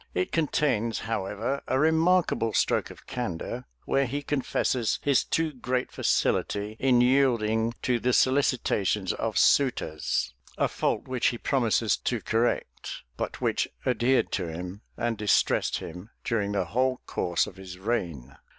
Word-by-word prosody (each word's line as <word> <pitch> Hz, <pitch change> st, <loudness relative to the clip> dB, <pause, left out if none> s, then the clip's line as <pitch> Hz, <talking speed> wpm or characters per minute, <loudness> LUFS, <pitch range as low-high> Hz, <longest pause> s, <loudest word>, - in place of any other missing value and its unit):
It 90 Hz, -, 0 dB
contains, 135 Hz, -8 st, 0 dB
however, 110 Hz, +4 st, -2 dB
a 130 Hz, -, +1 dB
remarkable 160 Hz, -6 st, +3 dB
stroke -, -, +1 dB
of -, -, -13 dB
candor, 115 Hz, -10 st, -4 dB, 0.2 s
where 135 Hz, -1 st, +2 dB
he 145 Hz, +4 st, -3 dB
confesses 130 Hz, -4 st, 0 dB
his 140 Hz, -3 st, +3 dB
too 160 Hz, -2 st, 0 dB
great 125 Hz, 0 st, -2 dB
facility 105 Hz, +1 st, 0 dB
in 125 Hz, -2 st, +4 dB
yielding 120 Hz, -3 st, +2 dB
to 125 Hz, -2 st, +1 dB
the 125 Hz, +2 st, +1 dB
solicitations 120 Hz, -8 st, +2 dB
of 110 Hz, -1 st, -2 dB
suitors:[] 125 Hz, -, +2 dB, 0.2 s
a -, -, +2 dB
fault -, -, -1 dB
which 130 Hz, -2 st, +1 dB
he 120 Hz, -, 0 dB
promises 115 Hz, -4 st, +1 dB
to 120 Hz, -, -1 dB
correct, 115 Hz, +3 st, -2 dB
but -, -, -4 dB
which -, -, +1 dB, 0.2 s
adhered 125 Hz, +1 st, +2 dB
to 90 Hz, -, -1 dB
him, 90 Hz, +5 st, -6 dB, 0.2 s
and 120 Hz, -3 st, -1 dB
distressed 105 Hz, -1 st, +2 dB
him, 90 Hz, +6 st, -8 dB
during 105 Hz, -3 st, -1 dB
the 95 Hz, -3 st, 0 dB
whole 130 Hz, +7 st, 0 dB
course 85 Hz, -1 st, 0 dB
of 95 Hz, -, -11 dB
his 95 Hz, -2 st, -9 dB
reign. 85 Hz, -, -3 dB
115 Hz, 140 wpm, -27 LUFS, 100-130 Hz, 0.2 s, in